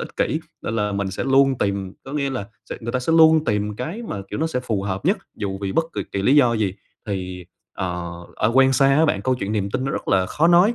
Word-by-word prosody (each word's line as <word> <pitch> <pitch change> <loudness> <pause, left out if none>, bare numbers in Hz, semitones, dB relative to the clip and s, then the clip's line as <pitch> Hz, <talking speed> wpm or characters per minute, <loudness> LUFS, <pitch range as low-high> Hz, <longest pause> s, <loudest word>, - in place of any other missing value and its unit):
ích - - -7
kỷ, - - 0 0.2
nên 115 - -2
là 105 -1 0
mình 100 -1 -2
sẽ 95 - -3
luôn 135 -1 +4
tìm, 100 -2 -1
có 135 - -8
nghĩa 140 -2 -1
là 125 -7 -4 0.2
sẽ - - -3
người 115 +1 -4
ta 130 - +1
sẽ 160 +6 0
luôn 160 -1 +6
tìm 105 -3 -1
cái 170 - -5
mà, - - -3
kiểu, - - -3
nó 160 - +2
sẽ 145 -6 -2
phù 110 -6 -2
hợp 95 -1 -3
nhất, 190 +6 +2 0.2
dù 95 -2 -4
vì 95 - -2
bất 165 - +2
kỳ - - -1
kỳ 100 - -1
lý 130 +8 +4
do 125 -5 +5
gì. 105 -4 0 0.3
Thì, 90 -2 -4 0.3
ờ, 90 -1 -4 0.2
ờ, 105 - +2
quen 135 0 +6
xa 135 +1 +4
á 160 - +5
bạn 100 - 0
câu 130 +4 +2
chuyện 105 -4 -3
niềm 100 -2 -1
tin 130 - -2
nó 135 - -1
rất - - -4
là 95 -2 +3
khó 155 - +2
nói, 180 +7 +5
115 Hz, 275 wpm, -22 LUFS, 100-140 Hz, 0.3 s, luôn